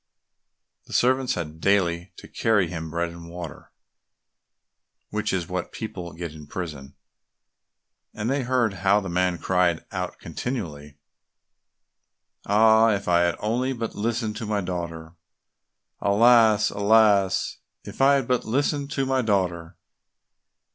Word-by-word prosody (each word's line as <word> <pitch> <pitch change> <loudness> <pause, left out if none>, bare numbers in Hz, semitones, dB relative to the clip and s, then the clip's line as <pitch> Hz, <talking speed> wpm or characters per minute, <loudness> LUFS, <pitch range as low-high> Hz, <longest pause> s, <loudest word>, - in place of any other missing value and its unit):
The - - -10
servants 130 +1 +2
had 80 0 -6
daily 90 -3 +1
to - - -11
carry 105 -5 +1
him 80 -2 -6
bread 85 +1 -2
and 85 0 -11
water, 85 -1 -9 1.4
which 105 0 -1
is 90 -3 -2
what 90 -1 -4
people 90 -6 -6
get 85 -1 -6
in 75 -2 -12
prison, 75 -5 -7 1.2
and 105 +1 -4
they 135 +2 0
heard 125 -4 +1
how 100 +2 +4
the 95 -3 -6
man 90 0 +1
cried 90 -3 +1
out - - -4
continually, 75 - -6 1.5
"Ah! 110 +2 +5
if 100 - -6
I 85 -1 +4
had 85 -1 +1 0.4
but 115 -1 -4
listened 110 0 -2
to 115 -2 -5
my 105 -1 0
daughter! 85 -2 -6 0.8
Alas, 110 0 +4
alas, 100 -2 +3 0.3
if - - -7
I 140 +1 +6
had 135 -4 -1
but 125 -1 +1
listened 140 +4 -1
to 135 - 0
my 130 0 +1
daughter!" 90 -6 -1
100 Hz, 130 wpm, -24 LUFS, 85-115 Hz, 1.5 s, I